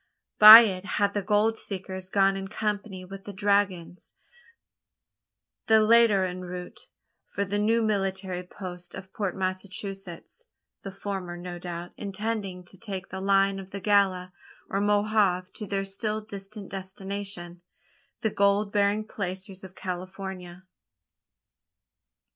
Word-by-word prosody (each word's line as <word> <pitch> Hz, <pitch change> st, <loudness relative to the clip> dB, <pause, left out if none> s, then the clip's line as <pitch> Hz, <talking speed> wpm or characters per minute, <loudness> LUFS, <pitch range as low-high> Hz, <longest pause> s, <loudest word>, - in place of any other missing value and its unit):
By 215 Hz, +2 st, +13 dB
it 190 Hz, -5 st, -1 dB
had 200 Hz, -1 st, +2 dB
the 205 Hz, -, -1 dB
gold 215 Hz, +3 st, +1 dB
seekers 190 Hz, -1 st, -6 dB
gone 195 Hz, 0 st, +3 dB
in 195 Hz, 0 st, -5 dB
company 205 Hz, -2 st, -3 dB
with 195 Hz, +1 st, -10 dB
the 205 Hz, -, -7 dB
dragoons 195 Hz, -3 st, -1 dB, 1.5 s
the 220 Hz, 0 st, +6 dB
latter 215 Hz, -3 st, +5 dB
en 180 Hz, 0 st, -5 dB
route 180 Hz, 0 st, -8 dB, 0.4 s
for 200 Hz, -, -2 dB
the 205 Hz, +1 st, -2 dB
new 225 Hz, +2 st, +2 dB
military 190 Hz, -3 st, -1 dB
post 180 Hz, -1 st, -9 dB
of 190 Hz, 0 st, -10 dB
Port 200 Hz, -4 st, -2 dB
Massachusetts 195 Hz, -, -5 dB, 0.4 s
the 195 Hz, -, -7 dB
former, 190 Hz, -3 st, -5 dB
no 175 Hz, 0 st, -7 dB
doubt, 175 Hz, 0 st, -6 dB
intending 200 Hz, -2 st, -4 dB
to 185 Hz, +1 st, -14 dB
take 195 Hz, -4 st, -6 dB
the 190 Hz, -, -6 dB
line 195 Hz, 0 st, +2 dB
of 190 Hz, -1 st, -10 dB
the 200 Hz, -, -6 dB
Gila 190 Hz, -2 st, +2 dB, 0.4 s
or 195 Hz, -, 0 dB
Mohave 205 Hz, -3 st, +1 dB
to 210 Hz, -, -7 dB
their 195 Hz, 0 st, -2 dB
still 210 Hz, +2 st, -2 dB
distant 200 Hz, -1 st, -9 dB
destination 190 Hz, -2 st, -6 dB, 0.6 s
the 220 Hz, -, 0 dB
gold 200 Hz, +1 st, +2 dB
bearing 205 Hz, +1 st, +1 dB
placers 190 Hz, -1 st, -6 dB
of 190 Hz, -1 st, -11 dB
California? 185 Hz, -1 st, -7 dB
195 Hz, 130 wpm, -27 LUFS, 185-205 Hz, 1.5 s, By